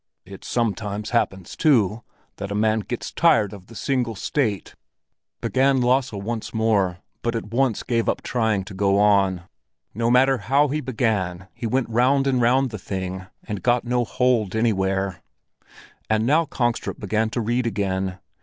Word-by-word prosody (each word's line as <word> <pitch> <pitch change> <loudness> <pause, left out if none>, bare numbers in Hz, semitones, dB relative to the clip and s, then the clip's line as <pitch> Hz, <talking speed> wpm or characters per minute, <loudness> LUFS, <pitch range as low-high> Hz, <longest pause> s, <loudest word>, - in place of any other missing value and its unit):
"It 95 +1 -11
sometimes 105 -3 -2
happens 95 -6 -1
too, 115 - +3 0.4
that 100 0 -5
a 100 - -3
man 110 +1 +2
gets 110 +4 -5
tired 115 - +3
of 95 -2 -12
the 115 - -14
single 125 -2 -1
state," 105 - -2 0.7
began 135 0 +2
Lasse 125 +1 +2
once 110 +3 -5
more, 105 -5 +1 0.2
but 115 0 -1
at 110 -2 -5
once 125 -2 +1
gave 115 -2 0
up - - -2
trying 110 -5 0
to 95 +1 -10
go 100 +1 +2
on. 100 -3 +3 0.5
No 115 +3 0
matter 130 +1 +4
how 140 +3 +2
he 150 +2 -1
began, 100 -8 -1
he 115 - -4
went 130 +1 0
round 130 +4 +2
and 130 -2 +2
round 130 +2 +3
the 110 - -6
thing 95 -1 -5 0.2
and 105 -3 -5
got 120 0 +2
no 125 0 +1
hold 120 -4 +1
anywhere! 95 -4 0 0.9
And 110 0 +2
now 155 +6 +3
Kongstrup 120 -5 -2
began 110 +2 0
to 120 - -2
read 120 +2 0
again. 95 -3 -2
110 Hz, 165 wpm, -23 LUFS, 100-125 Hz, 0.9 s, matter